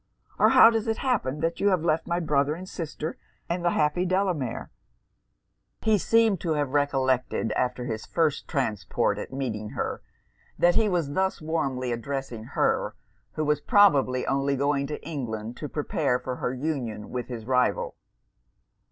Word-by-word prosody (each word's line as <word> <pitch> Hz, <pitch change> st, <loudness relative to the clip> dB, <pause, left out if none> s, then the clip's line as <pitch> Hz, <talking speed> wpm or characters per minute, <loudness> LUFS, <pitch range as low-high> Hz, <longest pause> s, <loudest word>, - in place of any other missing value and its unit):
or -, -, +6 dB
how 225 Hz, -, +8 dB
does 225 Hz, -1 st, -1 dB
it 225 Hz, 0 st, 0 dB
happen 150 Hz, -, -1 dB
that 165 Hz, +1 st, -1 dB
you 200 Hz, -, +2 dB
have 185 Hz, -5 st, +2 dB
left 160 Hz, -1 st, +1 dB
my 170 Hz, 0 st, 0 dB
brother 150 Hz, -2 st, +1 dB
and 185 Hz, +3 st, -9 dB
sister, 160 Hz, -3 st, -5 dB, 0.3 s
and 170 Hz, +1 st, -2 dB
the 175 Hz, -, +3 dB
happy 155 Hz, +2 st, +1 dB
Delamere?' 185 Hz, -, -1 dB, 1.1 s
He 215 Hz, -2 st, +3 dB
seemed 225 Hz, -3 st, +3 dB
to 165 Hz, -3 st, 0 dB
have 145 Hz, -3 st, -1 dB
recollected, 130 Hz, -5 st, +1 dB
after 125 Hz, +1 st, -1 dB
his 110 Hz, -2 st, -4 dB
first 160 Hz, -3 st, 0 dB
transport 105 Hz, -8 st, -1 dB
at -, -, -6 dB
meeting 115 Hz, -6 st, -3 dB
her, -, -, -2 dB, 0.6 s
that 175 Hz, 0 st, +4 dB
he 215 Hz, +2 st, +3 dB
was 170 Hz, -6 st, -1 dB
thus 190 Hz, +2 st, 0 dB
warmly 140 Hz, -6 st, -2 dB
addressing 120 Hz, -1 st, -4 dB
her -, -, +1 dB, 0.4 s
who 155 Hz, -, -2 dB
was 150 Hz, 0 st, +1 dB
probably 145 Hz, -9 st, +4 dB
only 140 Hz, +1 st, +1 dB
going 140 Hz, 0 st, 0 dB
to 150 Hz, 0 st, -6 dB
England 120 Hz, -7 st, -4 dB
to 150 Hz, -, -5 dB
prepare 145 Hz, -3 st, 0 dB
for 125 Hz, 0 st, -5 dB
her -, -, -2 dB
union 125 Hz, -6 st, -4 dB
with 125 Hz, -1 st, -3 dB
his 115 Hz, -3 st, -6 dB
rival. 125 Hz, 0 st, +1 dB
145 Hz, 160 wpm, -26 LUFS, 130-170 Hz, 1.1 s, how